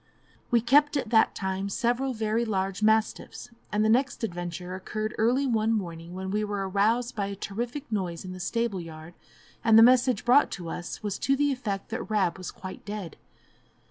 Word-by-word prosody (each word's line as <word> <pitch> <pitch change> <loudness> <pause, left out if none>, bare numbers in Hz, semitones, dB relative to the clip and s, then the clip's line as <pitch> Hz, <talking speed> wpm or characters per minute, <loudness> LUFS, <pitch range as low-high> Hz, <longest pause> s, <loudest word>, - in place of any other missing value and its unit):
We 235 -1 +3
kept 290 +5 +4
at 240 -5 -3
that 220 -1 +4
time 190 +1 -2
several 245 +5 0
very 220 +1 0
large 195 -3 -2
mastiffs, 220 +2 0 0.2
and 210 +1 +2
the - - +4
next 250 +3 +1
adventure 175 -2 -4
occurred 215 +4 -4
early 245 +5 +3
one 225 -3 +1
morning, 170 -5 -4
when 190 0 -4
we 210 +1 0
were 205 -2 -2
aroused 225 +6 +1
by 200 -2 -1
a 200 - -5
terrific 240 +8 -5
noise 185 -5 -2
in 185 - -6
the 185 - -9
stable 220 0 -1
yard, 160 0 -10 0.5
and 225 -1 +6
the 225 - +10
message 250 -2 +4
brought 250 +4 +5
to 175 -3 -6
us 175 +5 -6
was 205 -2 -3
to 275 - +2
the 290 +1 +2
effect 210 -7 -3
that 230 +1 -5
Rab 195 -4 +1
was 185 - -5
quite 185 0 -9
dead. 205 -4 -6
215 Hz, 190 wpm, -27 LUFS, 190-235 Hz, 0.5 s, the